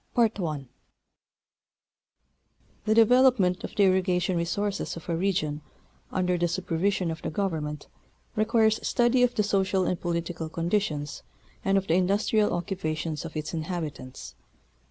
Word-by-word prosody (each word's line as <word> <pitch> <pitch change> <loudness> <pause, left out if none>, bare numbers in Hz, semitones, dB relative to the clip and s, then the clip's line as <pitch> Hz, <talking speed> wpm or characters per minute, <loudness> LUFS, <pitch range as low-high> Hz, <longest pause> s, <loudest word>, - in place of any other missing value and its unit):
TuE 235 -2 +5 2.6
development 225 -4 +4
of - - -7
the 205 - +4
irrigation 185 -1 +2
resources 195 +3 -2
of 165 - -10
a 170 - 0
region 165 -5 0 0.5
under 180 -1 0
the 175 - +2
supervision 180 +1 0
of 160 - -6
the - - -3
Government, 155 -5 -3 0.5
requires 220 0 +3
study 240 +1 +2
of 245 0 +3
the 215 - +2
social 195 -2 +1
and 180 - -1
political 170 -1 -3
conditions 165 -4 -1 0.4
and 195 0 +3
of 195 - 0
the 160 - +1
industrial 200 +4 +2
occupations 165 -3 -3
of 165 -1 -6
its 155 +2 -4
inhabitants. 155 -5 -5
180 Hz, 125 wpm, -27 LUFS, 165-205 Hz, 2.6 s, TuE